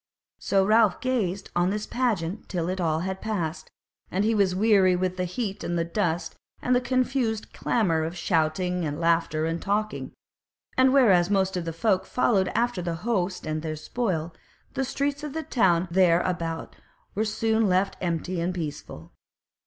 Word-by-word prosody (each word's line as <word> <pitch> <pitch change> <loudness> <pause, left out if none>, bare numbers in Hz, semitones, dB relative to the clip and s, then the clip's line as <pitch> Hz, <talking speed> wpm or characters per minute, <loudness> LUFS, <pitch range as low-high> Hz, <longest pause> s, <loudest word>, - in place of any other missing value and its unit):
So 195 -1 +2
Ralph 215 -2 +4
gazed 205 -8 -1
on 175 +1 +2
this 210 +1 -2
pageant 215 -7 -2
till 175 -1 -1
all 160 -1 +1
had 190 +1 -4
passed, 180 -7 -3 0.4
and 195 +3 0
he 225 - +2
was 195 -4 +2
weary 195 -3 +4
with 185 0 -1
the 180 0 -1
heat 200 +2 -4
and 175 - -1
the 165 - 0
dust 170 -1 -1 0.3
and 250 - +1
the 250 - +3
confused 250 -3 -1
clamour 170 -9 +1
of 165 +3 -4
shouting 175 +2 0
and 150 -1 -3
laughter 165 -2 +1
and 165 +1 -2
talking; 210 +2 -2 0.6
and 260 0 +5
whereas 195 -10 +5
most 190 -2 +1
of 175 -2 -2
the 165 - -2
folk 185 +3 0
followed 200 -6 +2
after 240 -5 +1
the 170 -1 -2
host 190 -7 -1
and 155 0 -2
their 155 -1 -3
spoil, 170 -2 -2 0.4
the 270 - -1
streets 285 +2 -2
of 300 -2 -5
the 320 0 -3
town 185 - +2
there 175 -1 +4
about 165 -3 -3 0.4
were 210 - 0
soon 220 0 +1
left 190 +2 +1
empty 175 0 -2
and 180 +2 -1
peaceful. 155 -5 -6
185 Hz, 170 wpm, -26 LUFS, 170-220 Hz, 0.6 s, and